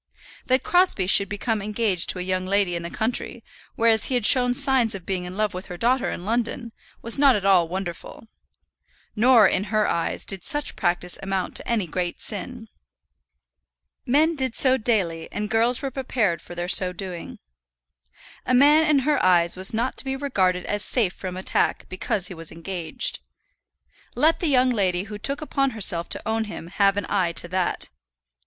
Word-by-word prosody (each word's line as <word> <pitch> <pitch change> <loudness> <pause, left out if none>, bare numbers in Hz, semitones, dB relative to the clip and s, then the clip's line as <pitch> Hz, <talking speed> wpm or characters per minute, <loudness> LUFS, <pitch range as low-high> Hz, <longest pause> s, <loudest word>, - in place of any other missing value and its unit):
That 260 +1 +2
Crosbie 355 - +2
should 195 +1 +3
become 215 +1 -2
engaged 210 -3 +2
to - - +2
a 180 - -4
young 185 0 -2
lady 195 -2 +1
in 170 - -3
the 170 - -6
country, 230 +3 -2 0.3
whereas 225 -1 +3
he 260 - -1
had 240 -4 0
shown 250 0 +5
signs 250 -5 +3
of 185 -3 -9
being 185 -2 -3
in 180 +2 -8
love 215 -1 -1
with 180 +1 -8
her 180 - -8
daughter 245 +6 0
in 175 - -6
London, 235 +1 -2 0.3
was 230 +4 +2
not 275 -3 +5
at 200 -2 -3
all 185 -4 +4
wonderful. 185 +4 -7 0.9
Nor, 230 -1 +5
in 195 - 0
her 215 +1 0
eyes, 170 - -2
did 195 -3 -2
such 295 0 -2
practice 175 0 -1
amount 195 -1 -3
to - - -6
any 225 -5 0
great 175 +1 -4
sin. 225 +3 -6 1.4
Men 310 +6 +2
did 260 -4 -2
so 260 -1 +4
daily, 195 -9 -1
and 210 +1 -4
girls 235 +4 +2
were 270 - -3
prepared 235 -9 -1
for 175 - -11
their 175 0 -4
so 185 0 +6
doing. 180 -1 -8 1.1
A 255 - 0
man 300 +4 +5
in 295 -2 +4
her 300 -1 +1
eyes 175 -2 +3
was 185 +1 0
not 235 +4 -2
to - - -2
be 265 0 -3
regarded 190 -10 -1
as 205 0 -2
safe 215 -8 +1
from 185 -1 -7
attack 185 - 0
because 185 +1 -2
he 195 - -8
was 165 -2 -8
engaged. 170 - -3 1.0
Let 320 +2 +2
the 345 - -1
young 255 -3 +3
lady 185 -5 0
who 210 0 -9
took 275 +7 -3
upon 275 -2 -1
herself 175 -5 +2
to - - -3
own 220 0 -1
him 190 -5 -9
have 195 +1 +1
an 205 - -2
eye 185 -4 0
to 170 - +1
that. 185 0 -2
205 Hz, 190 wpm, -23 LUFS, 185-250 Hz, 1.4 s, so